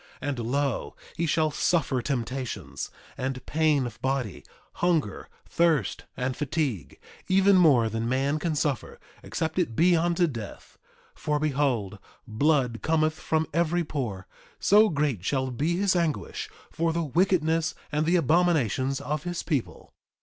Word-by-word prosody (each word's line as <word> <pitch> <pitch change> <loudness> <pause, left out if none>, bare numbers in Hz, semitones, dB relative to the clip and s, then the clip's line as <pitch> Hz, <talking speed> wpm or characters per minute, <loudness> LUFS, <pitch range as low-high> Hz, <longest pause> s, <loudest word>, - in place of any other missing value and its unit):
3:7 145 - -1
And 135 -4 -3
lo, 135 +2 -1 0.2
he 170 - -1
shall 155 0 +2
suffer 145 -5 +1
temptations, 130 0 -4 0.3
and 130 -1 -3
pain 155 -4 +2
of 115 -2 -8
body, 130 -6 -2 0.4
hunger, 165 - 0 0.2
thirst, 160 - +1
and 125 0 -1
fatigue, 140 - -2 0.3
even 195 +1 +5
more 145 -11 +5
than 115 +1 -2
man 135 +4 +1
can 160 0 -1
suffer, 145 -4 -2 0.2
except 160 +2 -3
it 140 -11 -1
be 175 +5 +4
unto 170 +1 +2
death; 115 -10 -8 0.3
for 150 0 -1
behold, 135 -9 0 0.3
blood 125 0 +1
cometh 155 -1 +2
from 160 0 -1
every 170 +1 +1
pore, 120 - -4 0.3
so 210 +2 +5
great 145 - -1
shall 130 +4 -1
be 150 +8 0
his 195 -1 +2
anguish 170 -4 -2 0.2
for 165 0 0
the 170 +1 -1
wickedness 165 0 +1 0.2
and 150 +1 0
the 175 - +3
abominations 145 - +2
of 150 0 -2
his 175 +1 -4
people. 145 -7 -3
150 Hz, 140 wpm, -27 LUFS, 130-165 Hz, 0.4 s, even